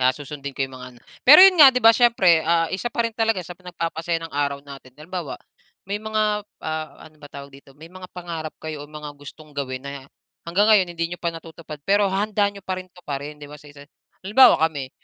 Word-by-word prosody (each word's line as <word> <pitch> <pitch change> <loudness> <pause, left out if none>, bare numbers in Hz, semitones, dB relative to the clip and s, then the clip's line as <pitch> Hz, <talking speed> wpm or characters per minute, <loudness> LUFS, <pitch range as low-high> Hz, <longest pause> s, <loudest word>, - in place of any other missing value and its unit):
susundin 140 -1 -8
ko 135 - -1
yung 130 - -14
mga 125 0 -10
ano. - - -19 0.2
Pero 300 +6 +9
'yon 370 -4 +4
nga 275 - +11
'di 250 - -2
ba 225 0 +8
siyempre, 195 -9 +4
ah, 165 0 +1
isa 240 +6 -3
pa 235 0 -1
rin 230 - -5
talaga 225 -2 0
sa 175 - -9
nagpapasaya 170 -2 -4
ng 165 - -9
araw 140 -1 -1
natin 135 -2 -13
halimbawa, 165 -1 -7 0.5
may 200 +2 -4
mga, 215 -1 -1 0.2
ah, 155 -1 -4 0.2
ano 155 0 -17
ba 145 - -11
tawag 140 0 -11
dito 135 0 -17
may 165 +3 -14
mga 185 0 -11
pangarap 165 -3 -7
kayo 155 -2 -7
o - - -22
mga 150 -1 -9
gustong 150 +1 -13
gawin 130 -2 -5
na 140 -1 -8 0.4
hanggang 195 +5 +2
ngayon 190 -4 +5
hindi 165 - -2
niyo - - -10
pa 170 - 0
natutupad 165 -2 -10
pero 200 0 +3
handa 205 +1 0
niyo 200 -1 -13
pa 185 -1 -3
rin 185 - -18
tuparin 150 -4 -7
'di 145 - -11
ba, 150 - -11
sa 145 - -16
isa. 145 0 -14 0.4
Halimbawa 245 +5 +6
kami, 140 -5 -5
165 Hz, 225 wpm, -22 LUFS, 145-200 Hz, 0.5 s, nga